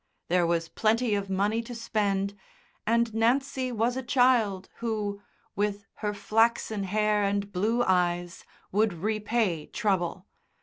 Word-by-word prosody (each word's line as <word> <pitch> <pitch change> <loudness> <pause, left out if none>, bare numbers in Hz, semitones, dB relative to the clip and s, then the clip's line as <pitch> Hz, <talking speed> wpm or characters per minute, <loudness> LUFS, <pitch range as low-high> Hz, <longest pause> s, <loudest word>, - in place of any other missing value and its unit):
There 175 -1 +3
was 165 -1 0
plenty 225 +4 +1
of 200 -1 -1
money 205 +4 +1
to 240 +1 -8
spend, 200 -3 -1 0.5
and 235 0 +2
Nancy 255 +3 +1
was 235 +1 0
a 260 - -2
child 240 -7 +2
who, 210 -3 -3 0.3
with 205 0 -1
her 210 -1 -2
flaxen 220 -1 +1
hair 210 +1 +1
and 200 0 -1
blue 220 +6 +1
eyes, 175 -2 0 0.3
would 210 0 +2
repay 210 -3 -1
trouble. 190 -4 -1
210 Hz, 130 wpm, -28 LUFS, 195-230 Hz, 0.5 s, There